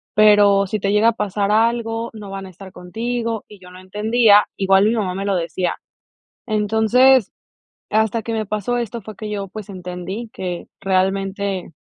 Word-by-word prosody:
pero 205 -2 +5
si 215 - -2
te 195 0 0
llega 210 +2 +4
a - - +2
pasar 205 -1 -1
algo, 230 +1 0
no 210 -2 -9
van 195 0 -6
a - - -11
estar 190 +2 -12
contigo 230 +5 -4
y 210 - -15
yo 180 0 -14
no 180 - -12
entendía, 210 +3 +3
igual 195 0 +4
mi 215 - +3
mamá 190 -5 -2
me 195 +1 -3
lo 200 -1 +1
decía, 175 +1 -2 0.7
entonces, 220 +3 +3 0.6
hasta 220 +1 +1
que 230 - -4
me 220 -1 -1
pasó 215 +4 -2
esto 235 -1 -4
fue 215 +2 -9
que 215 +1 -6
yo, 200 -1 -3
pues, 210 +1 -9
entendí 185 +4 -6
que 180 -2 -5
realmente 195 0 -1
205 Hz, 175 wpm, -20 LUFS, 195-220 Hz, 0.7 s, pero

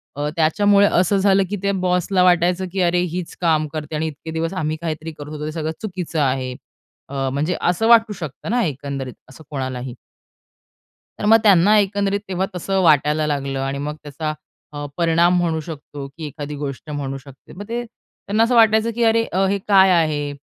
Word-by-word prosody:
अ, 145 +1 -2
त्याच्यामुळे 200 +5 +4
असं 185 +3 +2
झालं, 195 0 +3
की 205 - -2
त्या 200 - +1
बॉसला 180 0 +1
वाटायचं, 180 +1 +3
की 190 0 -1
अरे 175 0 +2
हीच 180 -1 -5
काम 155 -3 +2
करते 155 0 -6
आणि 155 +1 -1
इतके 160 +1 -8
दिवस 165 +2 -2
आम्ही 155 -4 -2
काहीतरी 160 0 -4
करत 150 -1 -10
होतो 150 0 -6
ते - - -3
सगळं 160 0 -3
चुकीचं 180 -6 -4
आहे. 130 -2 -1 0.5
अ, 135 -1 -2
म्हणजे 155 +6 -1
असं 180 +6 +1
वाटू 230 -2 +5
शकतं 160 -3 -7
ना 245 0 +2
एकंदरीत 140 -3 -4 0.2
असं 145 +4 -14
कोणालाही. 130 -3 -4 1.2
तर - - -3
मग 225 +2 +7
त्यांना 205 +1 +5
एकंदरीत 200 0 0
तेव्हा 190 0 -1
तसं 190 +2 -1
वाटायला 150 -1 +3
लागलं 140 -2 -2
आणि 135 +1 -2
मग 150 +1 -4
त्याचा 155 +1 -4 0.4
अ, 145 0 -5
परिणाम 170 +1 +3
म्हणू 165 -2 0
शकतो 145 -3 -8
की 160 - -6
एखादी 145 0 -7
गोष्ट 140 0 -6
म्हणू 140 -2 -4
शकते. 135 0 -15
मग 200 - -8
ते 240 +1 -2
त्यांना 225 -1 -3
असं 240 +1 +2
वाटायचं, 220 0 +4
की 235 +1 -1
अरे 230 0 +4 0.3
हे 200 - +1
काय 195 -2 +6
आहे? 155 -4 +1
165 Hz, 185 wpm, -20 LUFS, 145-195 Hz, 1.2 s, मग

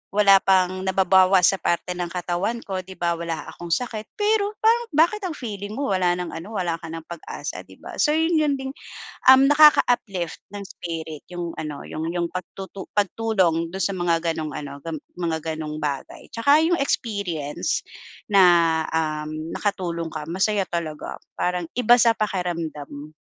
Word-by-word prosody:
wala 200 -2 +7
pang 185 -1 +2
nababawas 190 0 +4
sa 195 - -3
parte 175 +1 -1
ng 175 0 -3
katawan 180 +6 -2
ko, 190 -2 -3
'di 185 +1 -9
ba? 170 -1 0
Wala 165 -1 -4
akong 175 - -9
sakit, 225 -3 -3
pero 420 0 +1
parang 465 +1 +4
bakit 340 +7 +4
ang 320 - -5
feeling 205 -3 -6
mo 275 -5 -2
wala 180 -2 +2
nang 180 -1 -4
ano, 185 +7 -8
wala 170 -2 -1
ka 165 - -9
nang 165 0 -6
pag-asa, 170 -1 -7
'di - - -15
ba? - - -8
So 300 0 +3
'yon 325 +1 +2
'yon 300 -2 +2
din, 265 0 -4 0.6
uhm, 265 +1 +8
nakaka-uplift 245 - +4
ng 205 -1 -6
spirit 160 -4 -6
yung 175 -1 -4
ano, 150 -2 -5
yung 160 +2 -4
yung 175 -1 -1
pagtutu 190 +2 -7
pagtulong 190 -5 +1
do'n 190 - -5
sa 200 - 0
mga 175 -2 +1
gano'ng 155 -1 -4
ano, 140 -1 -6
ga 165 - -5 0.2
mga 170 -2 -1 0.2
gano'ng 155 -1 -5
bagay. 145 -2 -4
Tsaka 280 +6 +4
yung 350 +1 +3
experience 200 - -1 0.5
na, 200 -2 +6 0.5
uhm, 155 0 -2
nakatulong 170 -5 -2
ka, 150 -1 -6
masaya 190 +3 +1
talaga. 160 -3 -4 0.2
Parang 180 0 0
iba 240 -1 +6
sa 235 -1 +5
pakiramdam. 165 -7 -4
185 Hz, 165 wpm, -23 LUFS, 165-215 Hz, 0.6 s, uhm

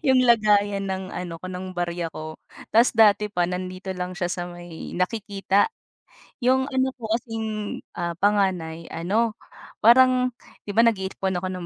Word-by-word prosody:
'yong 260 -2 +5
lagayan 205 -3 +3
ng 190 0 -3
ano 175 -2 -6
ko, 185 - -7
ng 185 0 -6
barya 175 -2 -3
ko. 155 0 -7 0.4
'Tas 230 +3 +5
dati 210 -2 +4
pa 175 -3 +1
nandito 185 +1 -5
lang 180 0 -4
siya 175 0 -2
sa 175 -1 -3
may 175 -2 -9
nakikita, 200 0 +1 0.8
'yong 265 +2 +3
ano 260 -1 0
ko 220 -2 -6
kasing, 220 -3 -4 0.2
ah, 170 0 -2
panganay 185 -5 +1
ano, 210 +7 0 0.5
parang 255 +2 +6 0.4
'di - - -2
ba 230 - +7
nag-iipon 190 -4 0
ako 185 - -2
ng 180 -2 -5
195 Hz, 155 wpm, -24 LUFS, 180-225 Hz, 0.8 s, ba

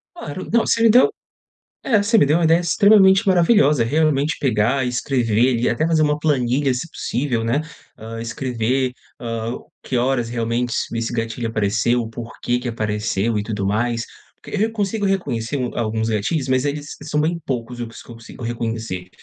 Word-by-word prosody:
Claro, 185 - -7
não, 235 -1 +3
você 230 - +1
me 230 - +6
deu 250 - +6 0.8
é 215 -5 +3
você 220 +3 +3
me 145 - +5
deu 150 +4 +3
uma 170 - +2
ideia 165 +2 +4
extremamente 195 +2 +5
maravilhosa. 170 - +4
Realmente 150 +3 +1
pegar 125 +1 +1
e - - -1
escrever 125 -2 -1 0.2
ali, 120 -1 -1
e - - +3
até 155 - 0
fazer 165 -1 +2
uma 150 -1 +2
planilha, 135 -2 +1
se 125 +7 -4
possível, 125 -6 -2
né, 120 +7 +1 0.4
hã, 115 +1 -7
escrever, 125 +2 -1 0.3
hã, 115 0 -4 0.3
que 130 - -2
horas 120 -1 0
realmente 120 +1 -1
es - - -1
esse 115 +1 -2
gatilho 115 0 -3
apareceu, 110 +3 +1
o 115 - -6
porquê 120 +1 -3
que 125 0 -4
apareceu 110 -1 -1
e 105 - -1
tudo 105 -2 -3
mais. 115 +3 0 0.4
Porque - - -7
re 205 +1 +2
eu 225 - -4
consigo 205 -1 -1
reconhecer 145 - -1 0.2
alguns 110 -1 -1
um - - -1
gatilhos, 130 +7 -1
mas 130 0 +2
eles 145 0 -4
são 150 0 -1
bem 165 +3 +1
poucos 125 -2 -4
os 115 -1 -7
que - - -18
eu - - -10
consigo 115 +2 -12
reconhecer. 115 -6 -4
125 Hz, 190 wpm, -20 LUFS, 115-155 Hz, 0.8 s, me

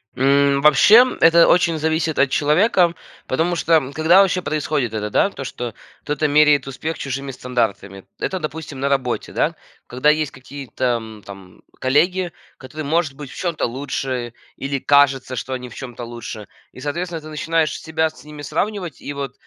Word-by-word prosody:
М, 140 +1 +3
вообще, 150 - +7 0.2
это 165 +1 +6
очень 170 -2 +3
зависит 160 0 -1
от 140 - +3
человека. 170 - +3 0.3
Потому 165 +6 0
что, 160 -5 +2
когда 160 +5 +5
вообще 185 -2 +1
происходит 150 -7 -2
это, 105 -1 -3
да, 195 - +2
то, 140 - -8
что 120 -3 -5 0.3
кто-то 150 +1 -1
меряет 150 -1 +4
успех 155 +5 -4
чужими 135 0 -4
стандартами. 110 -7 -3 0.2
Это, 190 - -2
допустим, 155 -3 -6
на 140 +1 0
работе, 130 -3 -1
да. - - 0 0.3
Когда 130 +4 +1
есть 155 -2 +1
какие-то, 130 -1 -9
м, 110 -2 -10
там 95 -2 -13 0.2
коллеги, 175 +7 +1 0.3
которые, 155 +3 -8
может 160 -1 0
быть, 140 0 -9
в - - -11
чём-то 170 -4 -1
лучше 130 -1 -4 0.2
или 140 0 -3
кажется, 140 -2 +3
что 130 +2 -4
они 125 -1 -5
в - - -13
чём-то 125 -2 -8
лучше. 115 -2 -8 0.2
И, - - -13
соответственно, 165 +4 -4
ты 155 - -11
начинаешь 165 0 -1
себя 160 0 -1
с 155 - -17
ними 150 0 -10
сравнивать 180 +1 -3
и, 145 - -6
вот, 140 -2 -5
145 Hz, 170 wpm, -20 LUFS, 130-160 Hz, 0.3 s, вообще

